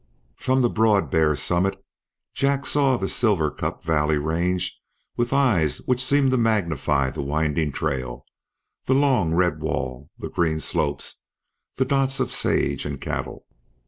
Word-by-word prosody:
From 130 - +1
the - - +5
broad 105 -10 +2
bare 80 -2 +3
summit 95 +5 0 0.5
Jack 140 0 0
saw 140 -3 +2
the 95 - -2
Silver 95 -12 +1
Cup - - -4
valley 75 -2 +1
range 85 +4 -1 0.3
with 120 0 -1
eyes 115 - +2
which 125 0 +1
seemed 135 0 +3
to 130 - +2
magnify 85 - +1
the - - -5
winding 75 +1 0
trail, 65 -4 -3 0.6
the 130 - +2
long 130 - +3
red 85 -3 +2
wall, 65 -3 -3
the - - -6
green 80 -2 0
slopes, 75 -4 -2 0.5
the 130 - +1
dots 135 0 +1
of 130 - -1
sage - - 0
and - - -5
cattle. - - -5
90 Hz, 145 wpm, -23 LUFS, 75-130 Hz, 0.6 s, the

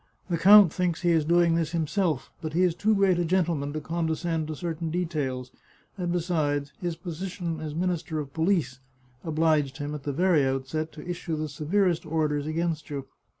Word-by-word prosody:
The 170 - +2
count 200 -1 +8
thinks 180 -3 -1
he 175 - +3
is 160 -3 +3
doing 170 +1 +4
this 165 0 0
himself, 165 -2 -1
but 155 -1 -4
he 180 +3 +3
is 180 -2 +3
too 215 +5 +2
great 195 -3 +3
a - - +2
gentleman 165 -5 0
to 155 - -2
condescend 165 0 -2
to 155 - -4
certain 165 0 -3
details, 150 -7 -2 0.4
and 180 -3 -2
besides, 155 -5 -1
his 175 -2 -2
position 175 -1 -5
as 155 -1 -5
Minister 175 -1 -1
of 140 -2 -6
Police 160 -7 0 0.4
obliged 155 -4 +1
him, 145 0 -4
at 150 - -5
the 145 - -3
very 170 0 +3
outset, 135 +4 -2
to 155 - -10
issue 175 -2 -3
the 155 0 -2
severest 175 +4 0
orders 150 -2 0
against 160 -1 -2
you. 140 -2 -4
160 Hz, 185 wpm, -27 LUFS, 150-175 Hz, 0.4 s, count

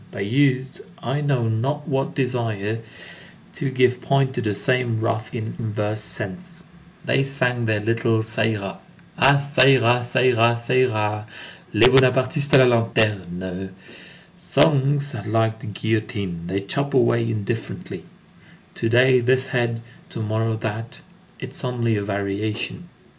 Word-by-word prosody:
They 100 - -3
used 130 +3 +1 0.2
I 135 +5 -3
know 135 -5 0
not 135 +7 -2
what 135 -2 -2
desires 115 -5 -2 0.7
to 135 - -3
give 125 -1 +2
point 135 -1 +1
to 125 - -2
the 105 -3 -1
same 125 -1 0
wrath 110 0 -2
in 110 -2 -5
inverse 105 -1 -3
sense. 180 - -7 0.4
They - - +2
sang 125 -3 -1
their 110 -1 +1
little 115 0 +1
_Ça 110 0 -1
ira: 100 -3 -5 0.2
_— - - -25 0.2
Ah! 140 +2 +6
ça 140 -1 +3
ira 125 -3 +5
ça 120 - 0
ira 120 -2 +4
ça 120 +1 -4
ira! 105 -4 +1 0.5
Les 110 +3 +7
Bonapartistes 130 +2 +3
à 130 -2 +7
la 120 -1 +4
lanterne! 95 -4 -2 0.6
Songs 140 0 +2
are 110 -3 -6
like 110 0 0
the - - -10
guillotine; 105 -4 -3
they 95 +2 -2
chop 140 +8 -3
away 120 -2 +3
indifferently, 115 0 -4 0.7
to 115 - -2
day 125 +2 +5
this 130 +2 +1
head, 120 -2 -1 0.3
to - - -7
morrow 110 +1 -1
that. 110 +1 -6 0.4
It - - -7
is - - -3
only 120 -3 0
a 100 - -1
variation. 100 - -4
115 Hz, 145 wpm, -22 LUFS, 110-130 Hz, 0.7 s, Les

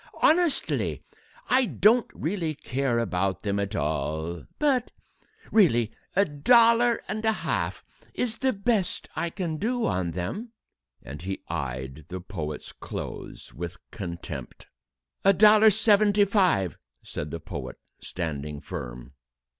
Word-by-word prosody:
Honestly, 335 -1 +2 0.4
I 255 0 +4
don't 225 +2 +4
really 165 -2 -2
care 130 -2 -1
about 95 -4 -1
them 100 -1 0
at 100 +1 -2
all 80 +3 -2
but 270 -5 +2 0.6
really 120 - +4 0.2
a 200 +2 +5
dollar 230 - +4
and 215 +2 -3
a 220 - +4
half 215 - -2 0.3
is 235 -2 -1
the 265 0 +2
best 200 -2 0
I 170 - -1
can 165 -3 -3
do 240 +6 0
on 90 -3 -1
them...." 200 - -4 0.5
And 70 +5 -8
he 95 +1 -5
eyed 65 -2 -4
the 95 +1 -5
poet's 80 -5 -6
clothes - - -7
with 85 +1 -6
contempt. 85 -5 -7 0.6
"A 195 - +6
dollar 215 +2 +7
seventy 210 -1 +4
five," 180 - +2 0.2
said 75 - -5
the 85 - -5
poet, 70 -9 -6 0.3
standing 75 -4 -4
firm. - - -7
125 Hz, 125 wpm, -26 LUFS, -, 0.6 s, dollar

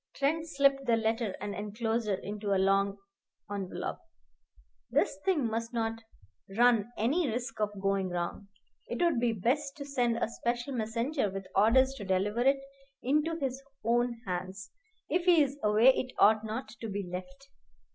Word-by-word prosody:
Trent 320 +4 0
slipped 275 -2 +2
the 235 - +5
letter 225 -2 0
and 205 +1 -4
enclosure 215 +1 -1
into 200 +1 -3
a - - +3
long 195 +1 +2 0.5
envelop. 185 -3 -4 0.9
"This - - +1
thing 350 -9 +2
mustn't 225 0 -2 0.6
run 240 -2 +4
any 280 +8 +1
risk 235 -1 -4
of 210 -1 -1
going 195 -1 0
wrong. 175 +3 -4 0.4
It - - -4
would 340 -8 +3
be 240 -1 +2
best 270 +8 -1
to 280 - -6
send 245 -4 0
a - - 0
special 240 +3 -3
messenger 230 +2 -1
with 195 0 -6
orders 255 +7 +5
to 205 - -6
deliver 195 +4 0
it 270 +2 +4 0.5
into 300 +5 +1
his 270 -3 -3 0.2
own 240 0 +1
hands. 185 +1 -5 0.4
If 350 0 0
he's 295 -6 +4
away 215 +4 +5
it 255 -1 +1
oughtn't 220 +3 +3
to 225 - -4
be 200 0 -3
left." 275 +11 -8
230 Hz, 150 wpm, -30 LUFS, 205-270 Hz, 0.9 s, the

